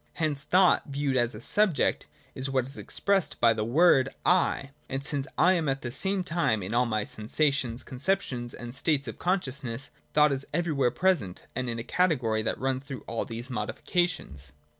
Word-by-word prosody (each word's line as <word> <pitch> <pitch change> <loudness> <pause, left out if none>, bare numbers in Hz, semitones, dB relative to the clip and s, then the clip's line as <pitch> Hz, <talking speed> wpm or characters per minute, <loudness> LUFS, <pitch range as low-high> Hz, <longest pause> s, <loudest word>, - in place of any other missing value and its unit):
Hence 155 -4 -1
thought, 185 +3 +4
viewed 140 -1 -1
as 120 -3 +1
a - - -7
subject, 205 - +2 0.3
is 130 +1 -4
what 130 -2 +1
is 135 - -7
expressed 200 -3 0
by 115 -1 +5
the 110 -1 -2
word 135 +2 +4
' - - -37 0.3
I 135 0 -7
': - - -36
and 135 +1 -3
since 145 -2 -2
I 185 - +5
am 165 -5 0
at 135 0 -2
the 120 - -3
same 190 +7 0
time 170 - 0
in 95 +5 -4
all 125 +1 +3
my 110 -2 0
sensations, 125 +2 0
conceptions, 130 -4 -2
and 120 0 -8
states 140 0 0
of 115 - -7
consciousness, 140 -8 -2 0.2
thought 150 -1 +5
is 135 0 -2
everywhere 155 -7 +1
present, 175 - 0
and 130 -1 -2
is 115 - -3
a 115 - -4
category 125 -10 +1
that 110 - -2
runs 130 0 -1
through 135 -2 -8
all 115 - -3
these 120 +3 -6
modifications. 105 - -2
135 Hz, 190 wpm, -28 LUFS, 120-160 Hz, 0.3 s, by